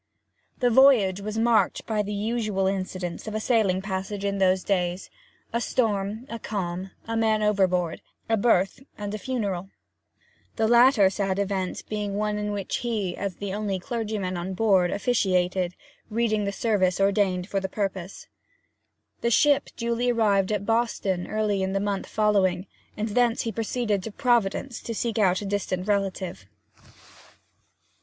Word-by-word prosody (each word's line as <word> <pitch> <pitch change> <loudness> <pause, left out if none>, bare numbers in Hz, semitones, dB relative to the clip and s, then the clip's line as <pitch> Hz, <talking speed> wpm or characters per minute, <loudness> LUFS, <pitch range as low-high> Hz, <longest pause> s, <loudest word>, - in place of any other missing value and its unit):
The 245 -1 +3
voyage 225 -7 +5
was 215 +2 -4
marked 230 0 +2
by 215 -2 0
the 205 0 -4
usual 210 -2 -1
incidents 185 -1 -3
of 215 - -4
a - - 0
sailing 215 -5 +1
passage 195 +1 -4
in 200 0 -1
those 185 -1 +3
days 180 -2 -1 0.4
a 235 - 0
storm, 215 -1 -1
a 230 -2 -6
calm, 190 -3 -4 0.2
a 230 - -2
man 220 -1 +2
overboard, 185 -5 +1 0.3
a 225 - +3
birth, 200 -3 +2 0.2
and 205 0 -5
a 215 - -4
funeral 200 -7 -3 0.9
the 220 -1 +1
latter 235 -4 +6
sad 195 -1 -1
event 195 -2 -2
being 210 -2 -3
one 210 0 -1
in 210 0 -2
which 200 -2 -2
he, 215 -7 -2
as 200 -3 -4
the 200 0 -5
only 205 -2 -1
clergyman 210 -3 -3
on 185 +2 -4
board, 190 -4 +3
officiated, 185 -5 +1 0.3
reading 215 -2 0
the 200 - -1
service 195 -4 +1
ordained 195 -2 +2
for 200 - -1
the 190 0 -4
purpose. 195 -2 -4 1.0
The 235 - +1
ship 285 +4 +3
duly 235 0 0
arrived 210 -4 +2
at 205 -1 -1
Boston 225 -5 0
early 215 -2 0
in 190 0 -1
the 195 - +1
month 200 -1 -2
following, 195 -4 +2 0.3
and 215 +1 -2
thence 240 +1 +2
he 230 - -2
proceeded 225 -2 -1
to 225 - -6
Providence 240 +1 0
to 230 - -5
seek 230 0 -1
out 185 -2 +3
a - - -5
distant 195 -2 -2
relative. 190 - -2
205 Hz, 155 wpm, -25 LUFS, 190-225 Hz, 1.0 s, latter